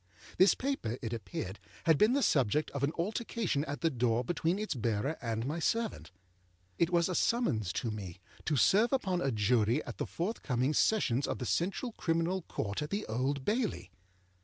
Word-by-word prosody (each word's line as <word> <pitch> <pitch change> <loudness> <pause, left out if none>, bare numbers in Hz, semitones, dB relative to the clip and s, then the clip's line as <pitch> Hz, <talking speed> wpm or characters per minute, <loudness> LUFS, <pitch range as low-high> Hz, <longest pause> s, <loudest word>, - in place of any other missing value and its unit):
This 190 +2 +7
paper, 255 - -2
it 115 0 -3
appeared, 110 - -5 0.2
had 160 -4 +4
been 215 +4 +5
the 280 0 +2
subject 145 +2 +2
of 140 - -4
an 140 - +2
altercation 200 -4 -1
at 145 +1 -5
the 165 -1 +2
door 120 -2 +1
between 170 +5 0
its 215 +1 -2
bearer 115 +3 -1
and 115 -1 -2
my 155 +5 -2
servant. 230 +6 -1 0.7
It 170 - +3
was 170 -1 +3
a 185 - -2
summons 125 - +1
to 115 - -2
me 95 -4 -7 0.3
to 155 - +1
serve 210 - +4
upon 190 -10 0
a 135 - +1
Jury 115 +4 +2
at - - -8
the - - -2
forthcoming 150 - -1
Sessions 145 - +2
of - - -2
the 125 - -4
Central 195 - -1
Criminal 170 0 0
Court 100 - -3
at 150 - -3
the 205 +4 -2
Old 130 +4 -1
Bailey. 210 - -1
150 Hz, 185 wpm, -32 LUFS, 120-190 Hz, 0.7 s, This